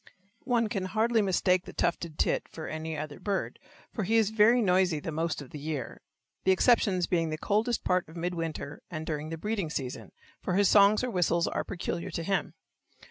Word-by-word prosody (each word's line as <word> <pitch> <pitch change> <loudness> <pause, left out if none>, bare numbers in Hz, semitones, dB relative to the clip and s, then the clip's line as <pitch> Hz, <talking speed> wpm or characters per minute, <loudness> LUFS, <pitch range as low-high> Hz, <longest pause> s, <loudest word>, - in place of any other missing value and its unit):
One 240 -3 +2
can 195 -3 -2
hardly 220 +4 +2
mistake 185 -1 +2
the - - -9
tufted 170 -2 -1
tit - - +1
for 160 - -8
any 155 0 -4
other 150 0 -6
bird, 195 +1 -2 0.3
for 215 - -2
he 220 +5 +1
is 220 -2 +3
very 220 +3 +5
noisy 185 -6 +3
the 160 - -5
most 160 -1 -2
of 130 - -15
the 150 - -7
year, 145 -5 -5 0.4
the 190 - +4
exceptions 190 -3 +3
being 165 -2 0
the 155 - -3
coldest 220 +7 0
part 180 0 +1
of 165 - -11
mid 175 +2 -2
winter 165 -3 -5
and 155 -2 -5
during 155 -1 -3
the 165 - -4
breeding 205 -1 -2
season, 130 -4 -5 0.3
for 180 - -1
his 200 0 +4
songs 205 +2 +6
or 250 - -1
whistles 170 -2 +2
are - - -1
peculiar 175 -1 -4
to 165 -1 -4
him. 195 +3 -1
180 Hz, 200 wpm, -29 LUFS, 160-205 Hz, 0.4 s, songs